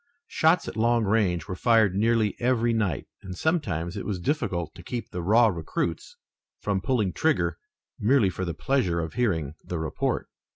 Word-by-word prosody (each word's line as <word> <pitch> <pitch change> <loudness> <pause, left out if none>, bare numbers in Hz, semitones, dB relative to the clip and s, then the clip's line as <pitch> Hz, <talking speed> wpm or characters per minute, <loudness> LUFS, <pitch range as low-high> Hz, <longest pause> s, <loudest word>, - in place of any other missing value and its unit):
Shots 160 +3 +2
at - - -6
long 115 +1 +2
range 95 -5 +1
were 95 - -4
fired 110 -2 +3
nearly 110 +1 +2
every 120 -1 +2
night, 105 -9 -1 0.2
and 90 -1 -8
sometimes 95 - -1
it 100 - -4
was 100 -4 -3
difficult 90 - -1
to 90 - -12
keep 120 +6 -5
the 90 - -4
raw 110 +7 +5
recruits 85 -3 -2 0.4
from 100 -2 -1
pulling 105 -3 0
trigger 160 0 +1 0.4
merely 110 -3 +3
for 95 - -4
the 85 -2 -3
pleasure 110 -8 0
of 80 -1 -4
hearing 85 - 0
the 90 - -4
report. 80 -2 -2
105 Hz, 170 wpm, -26 LUFS, 90-120 Hz, 0.4 s, raw